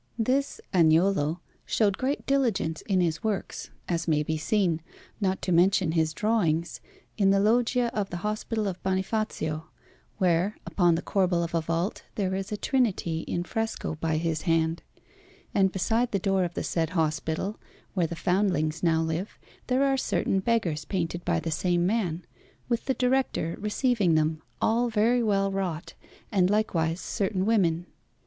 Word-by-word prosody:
This 260 +5 0
Agnolo 165 -1 +3 0.2
showed 205 -3 +1
great 275 +3 -1
diligence 235 - +1
in 190 -3 +2
his 170 +2 -1
works, 215 -3 -3 0.2
as 170 -1 -1
may 150 -2 +2
be 160 +1 -2
seen, 165 +1 +1 0.4
not 190 -2 -1
to 185 - -1
mention 180 0 +4
his 160 -1 +1
drawings, 170 -4 0 0.4
in 195 -1 +4
the 195 0 +4
loggia 240 +3 +2
of 205 -2 -1
the 175 - -4
Hospital 215 0 -1
of 185 -2 -4
Bonifazio, 190 -5 -1 0.5
where, 180 +3 +1
upon 175 -3 +3
the 165 - -3
corbel 180 -3 +1
of 170 - -5
a 165 - +2
vault, 165 +4 -2
there 190 -3 -1
is 195 +1 -3
a 210 - -2
Trinity 205 -11 0
in 175 - -1
fresco 225 0 -3
by 160 0 -1
his 160 -1 -1
hand; 165 -1 +1 0.7
and 190 -1 +3
beside 225 +6 +1
the 200 - +1
door 195 0 +1
of 175 - -6
the - - -2
said 165 -2 -1
hospital, 160 +6 -1 0.3
where 180 -4 +1
the 170 - -5
foundlings 180 -3 0
now 165 -2 +2
live, 160 +5 -3 0.3
there 255 +2 +2
are 270 -1 +2
certain 195 -6 0
beggars 190 -8 0
painted 175 0 -3
by 170 -1 +1
the 160 +1 -4
same 175 +2 +1
man, 180 -5 -1 0.4
with 235 -1 -1
the 265 - 0
Director 250 -10 0
receiving 210 - +1
them, 155 0 +1 0.2
all 235 +2 +2
very 230 +3 +2
well 195 -3 +1
wrought, 185 -4 -3 0.4
and 185 -3 +3
likewise 175 -6 +1
certain 195 -2 -1
women. 175 -6 +2
185 Hz, 160 wpm, -27 LUFS, 165-215 Hz, 0.7 s, mention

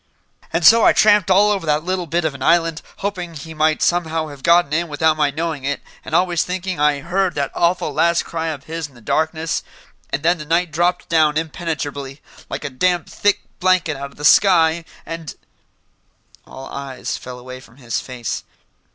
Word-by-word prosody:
"And 165 0 0
so 225 +4 +8
I - - +6
tramped 210 -3 +4
all 200 +3 +5
over 195 -5 -2
that 150 +1 +1
little 180 -1 -2
bit 170 +1 0
of 155 - 0
an 135 - -11
island, 165 +1 +2 0.2
hoping 180 -4 -4
he 160 +2 -8
might 155 0 +1
somehow 165 -2 0
have 140 -2 -11
gotten 170 -2 +4
in 170 +2 +1
without 155 +1 +2
my 150 -2 +2
knowing 155 -1 -3
it, 145 +1 -1 0.2
and 160 - -3
always 175 -2 +2
thinking 185 -2 -3
I 150 -1 +2
heard 180 +2 0
that 140 -1 -1
awful 175 +1 +1
last 170 0 +2
cry 165 -1 -3
of 150 -4 -4
his 160 0 -5
in 140 - -23
the - - -15
darkness 160 +6 -1 0.5
and 145 - -3
then 170 +1 +2
the 150 - -7
night 170 +2 +1
dropped 175 +3 0
down 155 -2 +3
impenetrably, 150 -4 -4 0.3
like - - -5
a 145 - -4
damn 175 +5 +1
thick 205 +6 0 0.2
blanket 180 -5 +2
out 140 +1 -6
of - - -21
the 145 - -4
sky, 165 -2 +5 0.2
and 165 -2 -7 0.6
" - - -33
All 135 - -10
eyes 135 -2 -5
fell 125 0 -8
away 130 +1 -9
from 115 -1 -18
his 120 -4 -3
face. 125 -3 -5
160 Hz, 195 wpm, -20 LUFS, 145-175 Hz, 0.6 s, so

